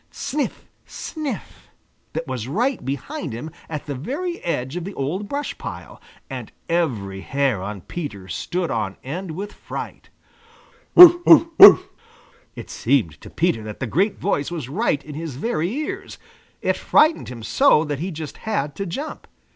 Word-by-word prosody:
Sniff! 295 Hz, 0 st, -4 dB, 0.2 s
Sniff! 290 Hz, -, -6 dB, 0.4 s
That 160 Hz, +1 st, -3 dB
was 130 Hz, -5 st, -4 dB
right 240 Hz, -, 0 dB
behind 140 Hz, -, -4 dB
him 125 Hz, +8 st, -6 dB, 0.2 s
at 150 Hz, -3 st, -5 dB
the 145 Hz, -, -4 dB
very 295 Hz, -, -4 dB
edge 130 Hz, -4 st, -2 dB
of 180 Hz, -, -3 dB
the 195 Hz, +3 st, -7 dB
old 180 Hz, +10 st, -3 dB
brush 285 Hz, +1 st, -3 dB
pile, -, -, -8 dB, 0.3 s
and -, -, -7 dB, 0.2 s
every 115 Hz, -, -1 dB
hair 135 Hz, -6 st, 0 dB
on 100 Hz, 0 st, -5 dB
Peter 105 Hz, -, -6 dB
stood 175 Hz, -, -3 dB
on 105 Hz, -4 st, -2 dB
end 175 Hz, +8 st, -5 dB
with 195 Hz, +6 st, -6 dB
fright. -, -, -8 dB, 0.9 s
"Bow, 350 Hz, 0 st, +11 dB
wow, 330 Hz, 0 st, +7 dB
wow!" 400 Hz, -, +12 dB, 0.8 s
It -, -, -9 dB
seemed 95 Hz, -, 0 dB
to -, -, -11 dB
Peter 115 Hz, -, 0 dB
that 105 Hz, -1 st, -8 dB
the 130 Hz, -, -2 dB
great 185 Hz, -, +1 dB
voice 145 Hz, -7 st, -1 dB
was 160 Hz, -8 st, -5 dB
right 155 Hz, -4 st, 0 dB
in 150 Hz, -, -8 dB
his 155 Hz, -2 st, -5 dB
very 170 Hz, -, -1 dB
ears. 295 Hz, +8 st, -5 dB, 0.5 s
It -, -, +1 dB
frightened 310 Hz, +1 st, +3 dB
him 120 Hz, -3 st, -8 dB
so 270 Hz, -, +4 dB
that 145 Hz, -3 st, -3 dB
he 180 Hz, +5 st, -3 dB
just 155 Hz, -4 st, -7 dB
had 150 Hz, -10 st, -2 dB
to 195 Hz, -, -3 dB
jump. 280 Hz, -, -6 dB
160 Hz, 165 wpm, -22 LUFS, 130-215 Hz, 0.9 s, wow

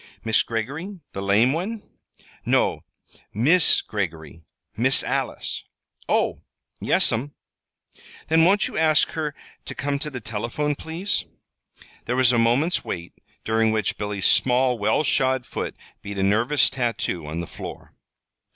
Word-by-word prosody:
"Mis' 110 Hz, -2 st, +3 dB
Greggory, 140 Hz, -, -4 dB
the 95 Hz, -, -4 dB
lame 105 Hz, +7 st, +3 dB
one?" 205 Hz, +6 st, -3 dB, 0.6 s
"No; -, -, +1 dB, 0.5 s
Miss 150 Hz, -, +5 dB
Greggory 80 Hz, -6 st, -5 dB, 0.3 s
Miss 130 Hz, +6 st, +4 dB
Alice." -, -, -2 dB, 0.5 s
"Oh! -, -, +1 dB, 0.4 s
Yes'm." 135 Hz, +6 st, +1 dB, 0.9 s
"Then 160 Hz, +1 st, +4 dB
won't 195 Hz, +4 st, +4 dB
you -, -, -9 dB
ask 155 Hz, -1 st, +3 dB
her 150 Hz, -3 st, -3 dB, 0.3 s
to -, -, -6 dB
come 140 Hz, 0 st, -2 dB
to 150 Hz, -, -4 dB
the 130 Hz, -3 st, -6 dB
telephone, 115 Hz, +7 st, -2 dB
please." 160 Hz, -, -3 dB, 0.8 s
There 125 Hz, -, -1 dB
was 130 Hz, -1 st, +4 dB
a 120 Hz, -, +3 dB
moment's 125 Hz, +9 st, +2 dB
wait, 85 Hz, -1 st, -5 dB, 0.3 s
during 110 Hz, 0 st, +2 dB
which 110 Hz, -3 st, -1 dB
Billy's 105 Hz, -2 st, -3 dB
small, 125 Hz, -1 st, +3 dB
well 110 Hz, +8 st, +2 dB
shod 130 Hz, -3 st, +1 dB
foot -, -, -5 dB, 0.3 s
beat 100 Hz, 0 st, -7 dB
a 95 Hz, -, 0 dB
nervous 120 Hz, +8 st, +3 dB
tattoo 115 Hz, -, -2 dB
on 80 Hz, +2 st, -4 dB
the 85 Hz, -, -3 dB
floor. -, -, -9 dB
120 Hz, 135 wpm, -24 LUFS, 105-150 Hz, 0.9 s, Miss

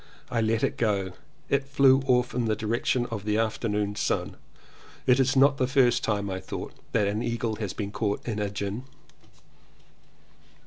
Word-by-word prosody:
I 115 Hz, -2 st, +1 dB
let 110 Hz, 0 st, +1 dB
it -, -, 0 dB
go 105 Hz, -4 st, +2 dB
and 95 Hz, -1 st, -5 dB, 0.3 s
it 140 Hz, 0 st, +1 dB
flew 135 Hz, -1 st, +4 dB
off 125 Hz, -1 st, +2 dB
in 120 Hz, -1 st, 0 dB
the 110 Hz, -1 st, +1 dB
direction 115 Hz, +3 st, 0 dB
of 105 Hz, -3 st, -4 dB
the 105 Hz, 0 st, 0 dB
afternoon 105 Hz, -2 st, -1 dB
sun. -, -, -1 dB, 0.7 s
It 125 Hz, +1 st, +4 dB
is 135 Hz, 0 st, +3 dB
not 135 Hz, +1 st, +5 dB
the 130 Hz, -, +1 dB
first 125 Hz, -3 st, +3 dB
time, 100 Hz, -2 st, 0 dB
I 95 Hz, -1 st, -3 dB
thought, -, -, -6 dB, 0.2 s
that 105 Hz, -, +2 dB
an 105 Hz, +2 st, -1 dB
eagle 115 Hz, -2 st, -2 dB
has 105 Hz, -4 st, -3 dB
been 100 Hz, -2 st, -4 dB
caught 105 Hz, 0 st, -2 dB
in 110 Hz, -3 st, -2 dB
a 105 Hz, -1 st, -1 dB
gin. 100 Hz, +4 st, -4 dB
115 Hz, 180 wpm, -27 LUFS, 105-125 Hz, 0.7 s, not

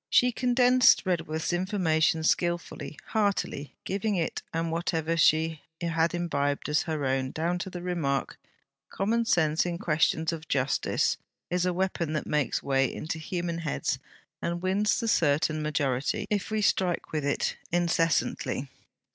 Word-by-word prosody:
She 250 Hz, 0 st, +5 dB
condensed 250 Hz, 0 st, +4 dB
Redworth's 165 Hz, -2 st, -1 dB
information 170 Hz, -4 st, +1 dB
skilfully, 170 Hz, -4 st, -1 dB
heartily 200 Hz, -9 st, -1 dB
giving 200 Hz, +2 st, -1 dB
it 170 Hz, -3 st, -1 dB
and 165 Hz, 0 st, -1 dB
whatever 165 Hz, -1 st, -1 dB
she 160 Hz, -1 st, +3 dB, 0.2 s
had 165 Hz, 0 st, +1 dB
imbibed, 145 Hz, -5 st, -1 dB
as 150 Hz, 0 st, +3 dB
her 155 Hz, -3 st, -1 dB
own, 130 Hz, 0 st, 0 dB
down 170 Hz, +5 st, -1 dB
to 190 Hz, -, -4 dB
the 175 Hz, -1 st, -7 dB
remark: 160 Hz, -7 st, -1 dB, 0.5 s
'Common 230 Hz, +4 st, 0 dB
sense 160 Hz, -6 st, +2 dB
in 175 Hz, -1 st, -2 dB
questions 160 Hz, 0 st, +1 dB
of 160 Hz, 0 st, -7 dB
justice, 135 Hz, 0 st, +1 dB, 0.3 s
is 180 Hz, 0 st, +1 dB
a -, -, +2 dB
weapon 175 Hz, -3 st, -1 dB
that 155 Hz, -, -2 dB
makes 150 Hz, -2 st, 0 dB
way 135 Hz, -2 st, +2 dB
into 160 Hz, +1 st, -4 dB
human 170 Hz, +1 st, -3 dB
heads 160 Hz, -3 st, -2 dB, 0.4 s
and 170 Hz, +1 st, -3 dB
wins 200 Hz, +3 st, +2 dB
the 230 Hz, -, -2 dB
certain 155 Hz, -5 st, +2 dB
majority, 140 Hz, -3 st, 0 dB
if 205 Hz, -3 st, 0 dB
we 215 Hz, -1 st, 0 dB
strike 185 Hz, -3 st, +1 dB
with 155 Hz, -2 st, -1 dB
it 140 Hz, -, 0 dB
incessantly.' 165 Hz, -5 st, 0 dB
165 Hz, 145 wpm, -28 LUFS, 155-180 Hz, 0.5 s, She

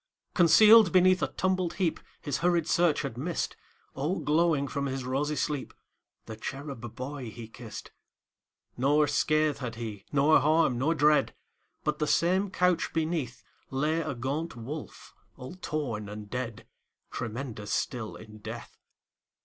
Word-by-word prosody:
Concealed 210 Hz, +3 st, +7 dB
beneath 185 Hz, +1 st, +5 dB
a -, -, +2 dB
tumbled 185 Hz, -2 st, -1 dB
heapHis 160 Hz, -5 st, -3 dB
hurried 170 Hz, -2 st, +1 dB
search 170 Hz, -4 st, +2 dB
had 125 Hz, -4 st, -5 dB
missed, 165 Hz, +4 st, -2 dB, 0.4 s
All 155 Hz, +8 st, -1 dB
glowing 150 Hz, -2 st, +2 dB
from 140 Hz, 0 st, -2 dB
his 135 Hz, -1 st, -3 dB
rosy 145 Hz, +4 st, -1 dB
sleep, 145 Hz, -2 st, -2 dB, 0.5 s
The 110 Hz, -, -7 dB
cherub 135 Hz, -1 st, -7 dB
boy 130 Hz, -1 st, -5 dB
he 115 Hz, +1 st, -9 dB
kissed. 115 Hz, -1 st, -10 dB, 0.8 s
Nor 145 Hz, +4 st, +3 dB
scath 155 Hz, 0 st, +1 dB
had 120 Hz, -3 st, -5 dB
he, 110 Hz, -4 st, -6 dB
nor 145 Hz, +2 st, +5 dB
harm, 150 Hz, -3 st, +3 dB
nor 155 Hz, +6 st, +1 dB
dread, 150 Hz, 0 st, +3 dB, 0.5 s
But, 150 Hz, 0 st, -1 dB
the 150 Hz, -, 0 dB
same 180 Hz, +6 st, +2 dB
couch 180 Hz, -2 st, +1 dB
beneath, 155 Hz, -8 st, -2 dB, 0.3 s
Lay 150 Hz, +5 st, 0 dB
a 155 Hz, -4 st, -3 dB
gaunt 140 Hz, +7 st, -3 dB
wolf, 135 Hz, +7 st, -8 dB, 0.2 s
all 125 Hz, +6 st, -8 dB
torn 140 Hz, -, -4 dB
and 105 Hz, 0 st, -8 dB
dead, 125 Hz, -4 st, -4 dB, 0.5 s
Tremendous 115 Hz, -3 st, -5 dB
still 120 Hz, -4 st, -2 dB
in 110 Hz, -1 st, -12 dB
death. -, -, -9 dB
145 Hz, 140 wpm, -29 LUFS, 125-165 Hz, 0.8 s, Concealed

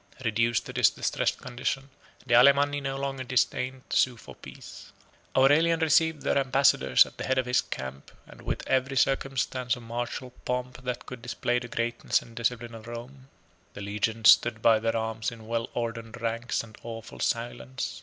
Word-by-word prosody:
Reduced 115 Hz, +1 st, +1 dB
to -, -, -8 dB
this -, -, +5 dB
distressed -, -, -1 dB
condition, 135 Hz, +3 st, -4 dB, 0.3 s
the 120 Hz, -, 0 dB
Alemanni 140 Hz, +3 st, +5 dB
no 135 Hz, 0 st, -3 dB
longer 135 Hz, -1 st, -3 dB
disdained 130 Hz, +1 st, 0 dB
to -, -, 0 dB
sue 125 Hz, -2 st, +3 dB
for -, -, -12 dB
peace. -, -, -12 dB, 0.5 s
Aurelian 155 Hz, +5 st, +5 dB
received 160 Hz, -1 st, +3 dB
their -, -, +2 dB
ambassadors 135 Hz, -, +4 dB
at -, -, -14 dB
the -, -, -3 dB
head 130 Hz, -, 0 dB
of 130 Hz, -, +1 dB
his 125 Hz, 0 st, +2 dB
camp, 65 Hz, +1 st, -7 dB, 0.2 s
and -, -, -15 dB
with -, -, -4 dB
every 130 Hz, +1 st, +1 dB
circumstance 130 Hz, -2 st, 0 dB
of 120 Hz, -, -11 dB
martial 120 Hz, +2 st, -4 dB
pomp 125 Hz, 0 st, -3 dB
that 125 Hz, -1 st, -3 dB
could 125 Hz, -2 st, -9 dB
display 120 Hz, 0 st, -1 dB
the 125 Hz, -, -8 dB
greatness 115 Hz, 0 st, 0 dB
and 115 Hz, -, -15 dB
discipline 120 Hz, 0 st, -2 dB
of 115 Hz, 0 st, -10 dB
Rome. 125 Hz, +3 st, -9 dB, 0.5 s
The -, -, -7 dB
legions 105 Hz, +2 st, +4 dB
stood 110 Hz, -2 st, +2 dB
to 115 Hz, -1 st, +6 dB
their 115 Hz, 0 st, 0 dB
arms 110 Hz, 0 st, -2 dB
in 115 Hz, -2 st, -11 dB
well 115 Hz, 0 st, -2 dB
ordered 115 Hz, 0 st, -4 dB
ranks 115 Hz, +1 st, -2 dB
and 110 Hz, -1 st, -13 dB
awful 115 Hz, -1 st, -8 dB
silence. 90 Hz, -, -3 dB
120 Hz, 175 wpm, -27 LUFS, 115-130 Hz, 0.5 s, to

